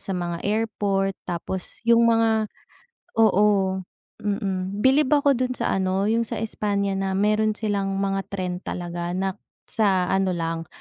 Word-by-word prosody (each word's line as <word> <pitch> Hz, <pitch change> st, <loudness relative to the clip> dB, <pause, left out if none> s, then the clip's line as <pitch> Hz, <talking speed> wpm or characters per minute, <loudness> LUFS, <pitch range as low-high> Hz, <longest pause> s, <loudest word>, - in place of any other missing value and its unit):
sa 195 Hz, -, -4 dB
mga 175 Hz, -1 st, -3 dB
airport 200 Hz, -2 st, 0 dB
tapos 180 Hz, +1 st, -5 dB
yung 235 Hz, 0 st, +6 dB
mga 225 Hz, -1 st, +3 dB, 0.7 s
oo, 205 Hz, -3 st, +4 dB, 0.4 s
mm. 200 Hz, -1 st, -2 dB
Bilib 265 Hz, +1 st, +4 dB
ako 285 Hz, -1 st, +4 dB
dun 255 Hz, 0 st, 0 dB
sa -, -, 0 dB
ano 190 Hz, +1 st, 0 dB
yung 230 Hz, +1 st, +1 dB
sa -, -, -4 dB
Espanya 200 Hz, -2 st, -1 dB
na 195 Hz, 0 st, -1 dB
meron 215 Hz, +2 st, +2 dB
silang 200 Hz, -3 st, -1 dB
mga 195 Hz, 0 st, -1 dB
tren 185 Hz, -2 st, -3 dB
talaga 175 Hz, 0 st, -4 dB
na 190 Hz, 0 st, -1 dB, 0.3 s
sa 190 Hz, -4 st, +2 dB
ano 190 Hz, -1 st, +1 dB
lang 165 Hz, 0 st, -3 dB
195 Hz, 145 wpm, -24 LUFS, 185-215 Hz, 0.7 s, yung